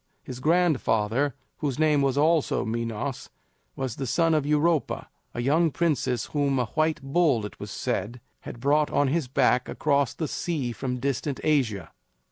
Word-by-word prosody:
His 125 Hz, -1 st, -8 dB
grandfather, 140 Hz, -6 st, +1 dB, 0.2 s
whose 140 Hz, -4 st, -2 dB
name 155 Hz, -2 st, +3 dB
was 135 Hz, -1 st, +1 dB
also 155 Hz, +1 st, +2 dB
Minos, 115 Hz, +3 st, -3 dB, 0.5 s
was 130 Hz, -4 st, -4 dB
the 135 Hz, -, -3 dB
son 165 Hz, +6 st, +2 dB
of 150 Hz, -2 st, +1 dB
Europa, 150 Hz, +1 st, +1 dB, 0.3 s
a 120 Hz, -, -2 dB
young 160 Hz, +6 st, +3 dB
princess 140 Hz, -7 st, 0 dB
whom 140 Hz, -2 st, +1 dB
a 125 Hz, -, +1 dB
white 155 Hz, +7 st, 0 dB
bull, 135 Hz, -6 st, +2 dB
it 105 Hz, -, -9 dB
was -, -, -7 dB
said, 115 Hz, +7 st, -3 dB, 0.2 s
had -, -, -9 dB
brought 145 Hz, +4 st, +2 dB
on 145 Hz, -2 st, +2 dB
his 155 Hz, -1 st, 0 dB
back 125 Hz, -1 st, +2 dB
across 140 Hz, -4 st, +1 dB
the 160 Hz, -, -2 dB
sea 145 Hz, -9 st, -2 dB
from 125 Hz, +1 st, -3 dB
distant 140 Hz, +1 st, -2 dB
Asia. 115 Hz, -, 0 dB
140 Hz, 160 wpm, -26 LUFS, 125-155 Hz, 0.5 s, name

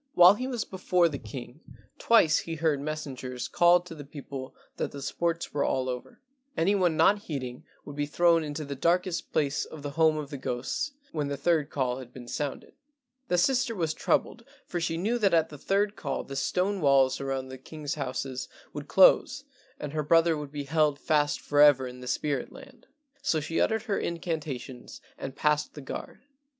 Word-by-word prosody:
While 180 Hz, +2 st, +9 dB
he 255 Hz, +5 st, -4 dB
was 245 Hz, -4 st, -2 dB
before 180 Hz, -2 st, +2 dB
the 140 Hz, -3 st, -5 dB
king 120 Hz, +4 st, -9 dB, 0.4 s
twice 170 Hz, -10 st, +5 dB
he 165 Hz, -, -5 dB
heard 155 Hz, -3 st, +1 dB
messengers 135 Hz, -4 st, -5 dB
call 175 Hz, 0 st, +5 dB
to 175 Hz, -1 st, -10 dB
the 150 Hz, -2 st, -9 dB
people 140 Hz, -2 st, -8 dB, 0.2 s
that -, -, -2 dB
the 140 Hz, -, -8 dB
sports 170 Hz, +4 st, -2 dB
were 145 Hz, -, +1 dB
all 130 Hz, -1 st, 0 dB
over; 125 Hz, -1 st, -6 dB, 0.4 s
any 190 Hz, +5 st, +3 dB
one 180 Hz, -5 st, +2 dB
not 205 Hz, +1 st, +5 dB
heeding 130 Hz, -, -6 dB, 0.2 s
would 145 Hz, -, -8 dB
be 145 Hz, 0 st, -1 dB
thrown 170 Hz, +2 st, +3 dB
into 150 Hz, 0 st, -5 dB
the 140 Hz, -, -5 dB
darkest 175 Hz, +4 st, 0 dB
place 145 Hz, -1 st, +1 dB
of 155 Hz, -2 st, -10 dB
the 145 Hz, -, -4 dB
home 160 Hz, +1 st, +3 dB
of 150 Hz, -1 st, -5 dB
the 140 Hz, -, -5 dB
ghosts 125 Hz, -, -3 dB, 0.2 s
when 150 Hz, -3 st, -2 dB
the 140 Hz, 0 st, -3 dB
third 155 Hz, 0 st, +1 dB
call 130 Hz, -2 st, -1 dB
had 125 Hz, -2 st, -10 dB
been 125 Hz, -1 st, -11 dB
sounded. 145 Hz, +2 st, -4 dB, 0.5 s
The 180 Hz, -, +1 dB
sister 245 Hz, +4 st, +2 dB
was 165 Hz, -4 st, -1 dB
troubled, 230 Hz, -, 0 dB, 0.2 s
for 175 Hz, -, -3 dB
she 165 Hz, -1 st, -1 dB
knew 220 Hz, +8 st, 0 dB
that 195 Hz, -5 st, +3 dB
at 160 Hz, -1 st, +2 dB
the 150 Hz, -, -10 dB
third 200 Hz, +4 st, +1 dB
call 140 Hz, -8 st, -3 dB
the 135 Hz, -, -8 dB
stone 185 Hz, +7 st, 0 dB
walls 135 Hz, -2 st, +4 dB
around 135 Hz, -1 st, -3 dB
the 130 Hz, 0 st, -9 dB
king's 150 Hz, +2 st, -5 dB
houses 130 Hz, -2 st, -4 dB, 0.2 s
would 145 Hz, 0 st, -6 dB
close 190 Hz, -, +5 dB, 0.4 s
and 145 Hz, -1 st, -5 dB
her 155 Hz, -, 0 dB
brother 165 Hz, +2 st, +4 dB
would 150 Hz, -2 st, -6 dB
be 145 Hz, -1 st, -4 dB
held 150 Hz, 0 st, +2 dB
fast 150 Hz, 0 st, +1 dB
forever 145 Hz, -2 st, +5 dB
in 125 Hz, 0 st, -9 dB
the 125 Hz, -, -8 dB
spirit 140 Hz, +1 st, -1 dB
land, 260 Hz, -3 st, -14 dB, 0.3 s
so 160 Hz, -, +1 dB
she 160 Hz, +2 st, -1 dB
uttered 220 Hz, -1 st, +1 dB
her 205 Hz, -4 st, -1 dB
incantations 155 Hz, -7 st, -5 dB, 0.2 s
and 135 Hz, -, -6 dB
passed 150 Hz, -1 st, +1 dB
the -, -, -7 dB
guard. 135 Hz, -, -7 dB
150 Hz, 195 wpm, -28 LUFS, 140-175 Hz, 0.5 s, While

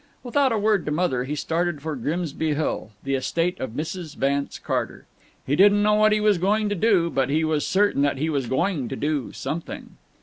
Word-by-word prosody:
Without 265 Hz, +2 st, +2 dB
a 225 Hz, -, +1 dB
word 210 Hz, -3 st, +2 dB
to -, -, 0 dB
Mother 150 Hz, -6 st, 0 dB
he 145 Hz, +3 st, -3 dB
started 165 Hz, +1 st, -1 dB
for 155 Hz, +1 st, -4 dB
Grimsby 155 Hz, +2 st, -2 dB
Hill, 150 Hz, -7 st, -2 dB
the 135 Hz, -, -2 dB
estate 165 Hz, +6 st, -1 dB
of 130 Hz, -, -4 dB
Mrs. 155 Hz, +2 st, -5 dB
Vance 140 Hz, +1 st, -1 dB
Carter. -, -, -3 dB, 0.4 s
He 140 Hz, -, +1 dB
didn't 205 Hz, +3 st, +5 dB
know 210 Hz, 0 st, +4 dB
what 215 Hz, 0 st, +4 dB
he 215 Hz, -, +3 dB
was 210 Hz, -3 st, +3 dB
going 210 Hz, +3 st, +1 dB
to 205 Hz, -, -1 dB
do, 185 Hz, -4 st, +2 dB
but 135 Hz, 0 st, 0 dB
he 155 Hz, +3 st, +1 dB
was 155 Hz, -2 st, 0 dB
certain 200 Hz, -7 st, +2 dB
that 140 Hz, -1 st, +1 dB
he 155 Hz, +4 st, -1 dB
was 140 Hz, -6 st, -1 dB
going 145 Hz, +1 st, 0 dB
to 135 Hz, -, -4 dB
do 145 Hz, -2 st, -2 dB
something. 165 Hz, +2 st, -6 dB
160 Hz, 210 wpm, -24 LUFS, 140-200 Hz, 0.4 s, didn't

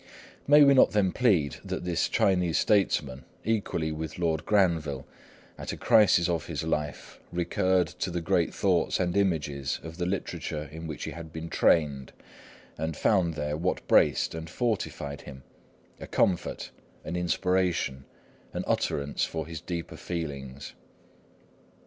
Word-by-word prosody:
May 145 Hz, +1 st, +8 dB
we 140 Hz, -1 st, +7 dB
not 130 Hz, -, +5 dB
then 100 Hz, -3 st, +3 dB
plead 90 Hz, -, +2 dB
that -, -, -4 dB
this 85 Hz, -2 st, 0 dB
Chinese 90 Hz, -4 st, +2 dB
statesman, 70 Hz, -10 st, +1 dB, 0.2 s
equally 100 Hz, -7 st, -1 dB
with 80 Hz, 0 st, -5 dB
Lord 80 Hz, -3 st, -1 dB
Granville, 80 Hz, -9 st, +1 dB, 0.5 s
at -, -, -4 dB
a -, -, -6 dB
crisis 100 Hz, -5 st, +5 dB
of 85 Hz, -3 st, -1 dB
his 80 Hz, -4 st, -3 dB
life, 75 Hz, -2 st, -3 dB
recurred 90 Hz, +1 st, +1 dB
to -, -, -1 dB
the 90 Hz, 0 st, -2 dB
great 85 Hz, 0 st, +1 dB
thoughts 90 Hz, -5 st, +1 dB
and 90 Hz, -1 st, 0 dB
images 75 Hz, -8 st, 0 dB
of 80 Hz, +1 st, -8 dB
the 90 Hz, -1 st, -1 dB
literature 80 Hz, -5 st, -3 dB
in 80 Hz, +1 st, -7 dB
which 80 Hz, -, -6 dB
he -, -, -4 dB
had 80 Hz, -1 st, -9 dB
been 80 Hz, +1 st, -6 dB
trained, 70 Hz, -5 st, +2 dB, 0.7 s
and 80 Hz, 0 st, -3 dB
found 90 Hz, -6 st, +2 dB
there 75 Hz, -1 st, -2 dB
what 90 Hz, +4 st, -2 dB
braced -, -, +4 dB
and 80 Hz, 0 st, -6 dB
fortified 95 Hz, -, -2 dB
him, 65 Hz, -1 st, -11 dB, 0.6 s
a -, -, -8 dB
comfort, 90 Hz, -3 st, 0 dB, 0.3 s
an -, -, -4 dB
inspiration, 90 Hz, -6 st, 0 dB, 0.5 s
an -, -, -2 dB
utterance 70 Hz, 0 st, -1 dB
for 80 Hz, -2 st, -2 dB
his 80 Hz, -2 st, -7 dB
deeper 85 Hz, -2 st, -5 dB
feelings? 70 Hz, -5 st, -6 dB
85 Hz, 145 wpm, -28 LUFS, 75-90 Hz, 0.7 s, May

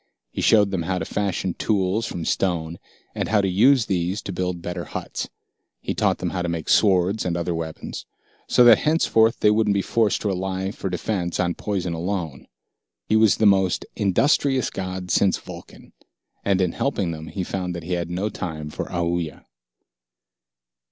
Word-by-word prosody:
He -, -, -4 dB
showed 105 Hz, -3 st, +4 dB
them 95 Hz, -3 st, -1 dB
how 90 Hz, +3 st, -1 dB
to -, -, -3 dB
fashion 95 Hz, -3 st, -2 dB
tools 105 Hz, +3 st, 0 dB
from 85 Hz, -2 st, -5 dB
stone 85 Hz, -3 st, -1 dB, 0.3 s
and -, -, -3 dB
how 105 Hz, -1 st, +3 dB
to 100 Hz, -, +1 dB
use 115 Hz, +6 st, +4 dB
these 90 Hz, +1 st, -1 dB
to 95 Hz, -, -5 dB
build 90 Hz, -1 st, -2 dB
better 90 Hz, 0 st, -4 dB
huts. -, -, -5 dB, 0.5 s
He -, -, -3 dB
taught -, -, +1 dB
them -, -, -3 dB
how 90 Hz, -, -2 dB
to 90 Hz, -, -2 dB
make 85 Hz, -2 st, -4 dB
swords 95 Hz, 0 st, +3 dB
and 85 Hz, -1 st, -1 dB
other 85 Hz, 0 st, -1 dB
weapons, 80 Hz, -1 st, -6 dB, 0.4 s
so 125 Hz, -, +5 dB
that 120 Hz, -2 st, +8 dB
henceforth 115 Hz, -7 st, +2 dB
they 105 Hz, -, +5 dB
wouldn't 105 Hz, -1 st, +2 dB
be 100 Hz, -, +1 dB
forced 110 Hz, -3 st, +1 dB
to 105 Hz, -, -1 dB
rely 95 Hz, 0 st, -2 dB
for 95 Hz, -, -5 dB
defense 90 Hz, -1 st, -2 dB
on 85 Hz, -1 st, +1 dB
poison 95 Hz, -4 st, -3 dB
alone. 85 Hz, -4 st, -4 dB, 0.6 s
He 110 Hz, -, +1 dB
was 110 Hz, -3 st, +5 dB
the 110 Hz, -, +2 dB
most 95 Hz, -3 st, +3 dB
industrious 130 Hz, -, +2 dB
god 95 Hz, -1 st, -5 dB
since 95 Hz, +1 st, +3 dB
Vulcan. -, -, -12 dB, 0.5 s
And 95 Hz, -1 st, +2 dB
in 90 Hz, -2 st, +1 dB
helping 100 Hz, -9 st, -1 dB
them 80 Hz, 0 st, -7 dB
he 95 Hz, -, -4 dB
found 90 Hz, -1 st, -3 dB
that 85 Hz, -, -6 dB
he 90 Hz, +2 st, -3 dB
had 85 Hz, -1 st, -2 dB
no 90 Hz, +4 st, -2 dB
time 80 Hz, -6 st, -5 dB
for -, -, -4 dB
Aoooya. 85 Hz, -3 st, -3 dB
95 Hz, 180 wpm, -23 LUFS, 85-105 Hz, 0.6 s, that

